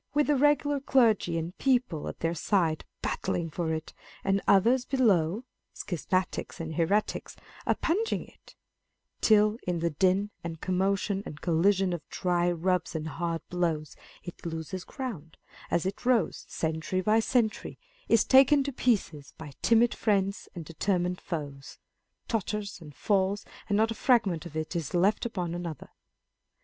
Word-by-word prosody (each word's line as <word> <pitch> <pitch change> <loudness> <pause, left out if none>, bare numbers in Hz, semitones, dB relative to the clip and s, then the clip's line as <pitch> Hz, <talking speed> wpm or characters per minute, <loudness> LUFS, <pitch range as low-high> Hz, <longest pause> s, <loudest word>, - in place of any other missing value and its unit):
with 295 0 +4
the 295 - +2
regular 290 +1 +3
clergy 225 -10 +3
and 165 +3 -4
people 245 - +1
at - - -7
their 165 0 0
side 170 -2 0 0.2
battling 165 -2 -2
for 160 0 -2
it, 160 0 -4 0.3
and 195 0 +1
others 235 +6 +4
below 215 - +2 0.3
(schismatics 185 +1 -2
and 160 -1 -4
heretics) 180 +7 0 0.3
oppugning 420 +7 0
it; - - -20 0.7
till 215 +1 +4
in 175 -1 0
the 170 0 0
din 190 +6 +2
and 165 -1 -5
commotion 195 +2 0
and 150 - -9
collision 185 +3 +2
of 170 - -4
dry 175 -1 +1
rubs 175 0 -1
and 160 0 -3
hard 165 -1 -3
blows, 165 -4 -1 0.3
it 175 - -9
loses 165 +2 -5
ground, 190 - -7 0.3
as 170 - +1
it 195 +2 -4
rose, 240 -9 +1
century 160 +3 -2
by 215 +4 +3
century; 225 -1 0 0.3
is 230 -2 +5
taken 275 +2 +6
to 280 0 -4
pieces 190 - -1
by 155 -2 -9
timid 235 +1 +4
friends 200 -2 0
and 170 -3 -6
determined 180 +2 -1
foes; 145 -6 -6 0.5
totters 210 -4 -3
and 150 -3 -12
falls, 200 0 0 0.2
and 205 - +2
not 220 +1 +3
a - - 0
fragment 205 - +2
of 155 -1 -8
it 155 +3 -4
is 165 -1 -3
left 200 +6 +2
upon 180 -7 -3
another. 170 -4 -6
185 Hz, 150 wpm, -28 LUFS, 165-220 Hz, 0.7 s, taken